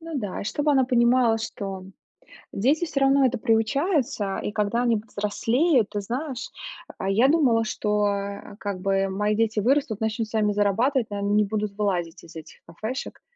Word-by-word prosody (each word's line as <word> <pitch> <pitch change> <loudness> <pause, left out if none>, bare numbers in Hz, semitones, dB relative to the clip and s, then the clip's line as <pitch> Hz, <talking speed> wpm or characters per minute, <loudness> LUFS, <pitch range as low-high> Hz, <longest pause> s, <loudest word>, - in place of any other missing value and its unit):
Ну 330 0 -9
да, 205 -7 -4
и - - -7
чтобы 290 +7 0
она 265 -2 +4
понимала, 240 -2 +3
что 195 -4 -6 0.7
дети 285 - +1
всё 275 -4 -2
равно 275 0 +4
это 250 0 +1
приучаются 225 - 0
и - - -2
когда 210 +3 0
они 235 -2 +2
повзрослеют, 225 +5 +1
ты 205 - -2
знаешь, 255 +5 -4 0.5
а 190 - -3
я 220 +7 +4
думала, 270 -7 +3
что, 210 -1 0
э, 200 0 -4
как 200 -3 -4
бы 195 0 +1
мои 210 +2 0
дети 225 -1 +1
вырастут, 245 -1 +1
начнут 220 0 -1
сами 210 -1 0
зарабатывать, 225 +5 +1
ну 205 - -3
они 200 0 -1
не 210 - +4
будут 210 0 -3
вылазить 180 -5 -2
из 165 0 -14
этих 160 -1 -10
кафешек. 220 +10 -6
220 Hz, 175 wpm, -24 LUFS, 200-255 Hz, 0.7 s, она